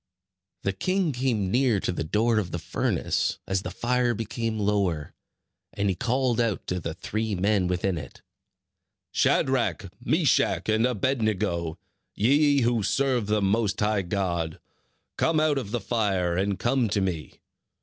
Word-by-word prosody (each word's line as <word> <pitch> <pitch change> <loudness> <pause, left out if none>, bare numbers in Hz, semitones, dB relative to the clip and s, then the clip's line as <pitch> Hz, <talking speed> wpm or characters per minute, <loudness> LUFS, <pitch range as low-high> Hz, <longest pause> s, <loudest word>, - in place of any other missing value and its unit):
The 100 - 0
king 185 - 0
came 120 -7 0
near 125 -3 +3
to - - -1
the 85 - -3
door 110 +7 +2
of 95 -4 -3
the 85 - -3
furnace, 80 - -1
as 95 -1 0
the 90 - -5
fire 120 +5 0
became 115 +1 -3
lower; 100 -7 0 0.6
and 100 0 0
he 95 - 0
called 125 +2 +1
out 115 -4 -1
to 90 - -1
the 80 -1 -5
three 110 0 -2
men 95 0 +2
within 90 0 -1
it: 75 - -11 0.9
"Shadrach, 120 -6 +1
Meshach, 145 - +2
and 110 +3 +3
Abed 125 +2 0
nego, 90 -6 -1 0.4
ye 140 +5 +4
who 120 -1 +2
serve 125 +1 +1
the 105 -1 +1
Most 105 +1 +1
High 105 -1 +1
God, 85 -4 -2 0.6
come 160 -1 +2
out 155 -2 +2
of 115 -7 -6
the 120 +3 -1
fire, 95 -5 0
and 95 +1 0
come 120 -2 +1
to 100 - +1
me." 90 -5 -3
105 Hz, 155 wpm, -26 LUFS, 95-120 Hz, 0.9 s, ye